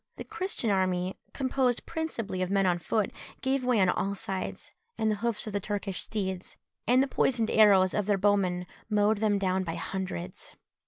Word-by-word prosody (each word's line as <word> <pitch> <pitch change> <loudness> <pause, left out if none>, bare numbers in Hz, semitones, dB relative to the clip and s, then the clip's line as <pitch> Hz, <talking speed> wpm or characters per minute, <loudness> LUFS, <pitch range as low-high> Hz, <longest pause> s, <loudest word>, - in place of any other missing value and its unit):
The - - -6
Christian 365 - -2
army, 185 -1 0 0.2
composed 260 -2 0
principally 235 - -3
of 185 - 0
men 195 0 +2
on 175 -1 +2
foot, 210 +4 0 0.3
gave 265 0 0
way 250 -3 +2
on 190 - +4
all 200 +2 0
sides, 190 -1 -5 0.3
and 220 0 +1
the 210 - -1
hoofs 230 0 0
of 215 - -6
the 205 - +1
Turkish 200 -1 -3
steeds, 190 -4 -4 0.3
and 255 +2 +5
the - - -1
poisoned 235 -4 +1
arrows 195 -4 +6
of 210 -1 0
their 205 -2 +3
bowmen, 190 -3 +2 0.2
mowed 210 0 +3
them 210 -2 +2
down 190 -1 0
by 165 -2 -4
hundreds. 170 - -5
205 Hz, 180 wpm, -29 LUFS, 185-225 Hz, 0.3 s, arrows